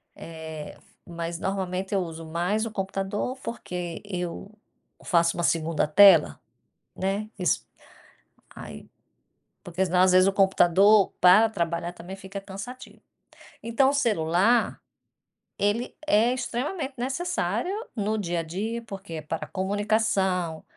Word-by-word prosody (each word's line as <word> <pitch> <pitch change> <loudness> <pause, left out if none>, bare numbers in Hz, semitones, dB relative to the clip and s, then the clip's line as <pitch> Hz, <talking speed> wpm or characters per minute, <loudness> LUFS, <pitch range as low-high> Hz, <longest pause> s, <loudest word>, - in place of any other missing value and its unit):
Eh, 160 -2 -8 0.3
mas 170 0 -5
normalmente 190 0 -3
eu 195 - +2
uso 165 -1 -7
mais 180 +7 -1
o 225 - -5
computador 195 +5 -3
porque 180 -7 -5
eu 180 -1 -5 0.5
faço 170 -3 +2
uma 175 - -1
2ª 165 -2 +1
tela, 185 -1 +6 0.6
né. 200 +3 -2
Isso 180 - 0 0.9
aí - - -10 0.8
porque 180 +1 -1
senão, 180 0 +2
às 185 0 +5
vezes, 185 +1 +5
o 195 - +3
computador 195 +1 +4
para 190 +5 +7
trabalhar 170 -3 -2
também 180 +2 -9
fica 195 +1 -8
cansativo. 200 +6 -10 0.6
Então 235 +4 +2
o - - -1
celular, 215 - +2 0.8
ele 210 +5 0
é 225 +4 +4
extremamente 265 +4 -3
necessário 265 - -2 0.2
no 215 0 -1
dia 175 -4 -2
a - - -2
dia, 210 +8 -4
porque 195 -5 -8
é 155 - -5
para 155 +2 -4
comunicação, 190 -4 0
190 Hz, 125 wpm, -26 LUFS, 175-215 Hz, 0.9 s, para